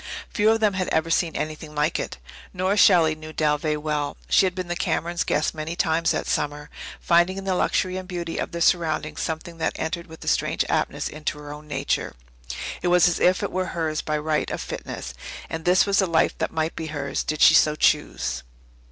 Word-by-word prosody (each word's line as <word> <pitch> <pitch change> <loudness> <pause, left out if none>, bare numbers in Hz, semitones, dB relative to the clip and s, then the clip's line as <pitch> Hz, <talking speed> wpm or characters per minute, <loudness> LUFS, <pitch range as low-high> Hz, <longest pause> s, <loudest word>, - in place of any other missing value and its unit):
Few 215 -2 +3
of 225 0 +3
them 210 -2 +2
had 185 -1 -1
ever 160 +1 0
seen 165 -1 +1
anything 155 0 -5
like 150 +1 +1
it. - - -5 0.4
Nora 185 +2 0
Shelley 170 -6 +6
knew 155 0 -9
Dalveigh 150 0 0
well. 150 -1 -2
She 190 - +5
had 180 - -4
been 185 -1 -4
the 175 - -2
Camerons' 170 -1 -1
guest 150 0 0
many 160 +1 -5
times 165 -1 +1
that - - 0
summer, 150 0 -2 0.3
finding 175 +2 +3
in 195 - -5
the 190 -1 0
luxury 185 0 0
and 185 -1 -6
beauty 170 -3 -4
of - - -3
their 170 - -4
surroundings 160 -3 +1
something 165 +1 -4
that 160 - -1
entered 170 +2 -3
with 160 0 -11
a - - -11
strange - - +1
aptness - - -1
into 150 0 -4
her 145 0 -8
own 150 +1 -11
nature. 150 - -2 0.7
It 180 - -1
was 175 -1 +5
as 175 - 0
if 185 +3 +3
it 200 - -2
were 185 0 -1
hers 155 -2 -1
by 155 0 -1
right 150 0 -1
of - - -3
fitness. 65 - -6 0.4
And 160 0 -5
this 180 +1 +5
was 200 -1 +2
the 190 - +3
life 165 -2 +2
that - - -1
might 160 0 -1
be 160 - -4
hers, 145 -2 -3
did 155 0 -3
she - - +8
so 150 0 +5
choose. 150 - +1
160 Hz, 215 wpm, -24 LUFS, 155-180 Hz, 0.7 s, she